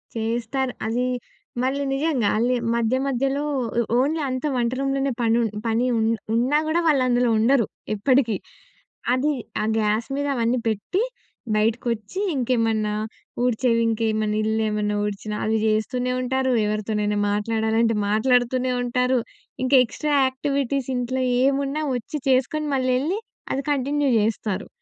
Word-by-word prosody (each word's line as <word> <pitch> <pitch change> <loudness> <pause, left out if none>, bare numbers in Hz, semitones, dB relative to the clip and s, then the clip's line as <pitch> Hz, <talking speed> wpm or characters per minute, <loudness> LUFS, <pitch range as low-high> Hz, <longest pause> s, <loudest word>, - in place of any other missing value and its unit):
చేస్తారు 235 +3 -1
అది 240 +3 0 0.6
మళ్ళీ 275 +2 0
నిజంగా 270 -7 +1
అల్లి 245 +3 +2 0.2
మధ్య, 235 +1 +1
మధ్యలో 275 +2 0 0.4
ఒ - - +4 0.2
ఓన్లీ 295 +5 +1
అంతా 255 +3 -2
వంట 240 -1 +1
రూమ్‍లోనే 275 0 0
పని 225 -1 +3
ఊన్ 225 - -1 0.2
పని 225 +2 +1
ఉ - - +1 0.4
ఉన్నా 255 +6 +3
కూడా 320 +2 +2
వాళ్ళు 285 -5 +4
అందులో 245 -1 +2
ఉండరు 230 +2 +3 0.3
ఎప్పటికీ. 235 +1 +2 0.8
అది 270 +4 +2 0.3
ఆ - - 0 0.2
గ్యాస్ 215 +1 0
మీద 285 +1 -1
అవన్నీ 235 +1 +1
పెట్టి, 225 - -1 0.5
బయటకొచ్చి 225 - -1 0.2
ఇంకేమన్నా 225 -4 +1 0.5
ఊడ్చేవి 240 -1 +2
ఇంకేమన్నా, 215 -1 0
ఇల్లు 220 +1 0
ఏమన్నా 210 0 -1
ఊడ్చినా 210 +1 -4
అవి 220 +1 +1
జేస్తూనే 245 +4 0
ఉంటారు, 260 +1 0
ఎవరితోనైనా 210 0 -1
మాట్లాడాలంటే, 220 +2 +1
మాట్లాడుతూనే 250 +3 +2
ఉంటారు. 250 +1 +1 0.5
ఇంకా 265 +2 +4
ఎక్స్ట్రా 300 +5 -3
యాక్టివిటీస్ 275 0 -1
ఇంట్లో 255 +1 -1 0.2
ఏమున్నా 275 +2 +1
వచ్చి 250 +5 -4
చేసుకొని, 265 +4 +1
మళ్లెళ్ళి, 260 +9 +1 0.3
అది 275 - -2
కంటిన్యూ 285 +1 +1
జేస్తారు. 210 -2 -1
245 Hz, 130 wpm, -23 LUFS, 220-270 Hz, 0.8 s, ఒ